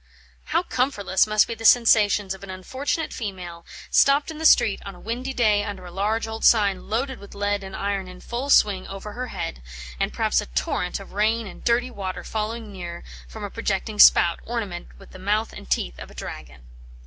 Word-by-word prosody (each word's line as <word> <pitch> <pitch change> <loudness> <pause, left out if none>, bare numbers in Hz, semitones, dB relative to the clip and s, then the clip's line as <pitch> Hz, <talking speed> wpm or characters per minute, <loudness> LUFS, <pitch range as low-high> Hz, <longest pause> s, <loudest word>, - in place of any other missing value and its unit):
How 335 +2 +1
comfortless 215 - +1
must 215 0 +4
be 235 - -3
the 225 0 -10
sensations 210 -4 +5
of 190 - -12
an 200 - -9
unfortunate 265 - -3
female, 180 -6 -6 0.2
stopped 280 +3 +4
in 310 - -9
the 320 - +5
street 210 -8 +4
on 195 -1 -8
a - - -14
windy 245 +4 -4
day 215 -5 +2
under 195 -3 -6
a 175 - -9
large 210 +5 0
old 220 0 -6
sign 200 -5 +3
loaded 260 +4 -1
with 200 - -12
lead 205 0 -1
and 190 0 -8
iron 200 -1 -2
in 180 0 -11
full 245 +7 -4
swing 200 -8 +4
over, 195 +2 -7
her 250 +2 -4
head? 60 - -5 0.4
and - - 0
perhaps - - +1
a - - -8
torrent 65 - -2
of 195 - -12
rain 220 +3 +1
and 195 - -11
dirty 240 +2 +1
water 190 -4 -5
falling 220 0 -4
near 175 -3 -7 0.2
from 220 - -9
a 205 - -5
projecting 210 -1 -2
spout, 170 - +7
ornamented 210 -7 -5
with - - -15
the 185 - -11
mouth 210 +4 0
and 65 - -11
teeth - - -1
of - - -9
a - - -15
dragon. 60 0 -8
205 Hz, 205 wpm, -24 LUFS, 190-230 Hz, 0.4 s, spout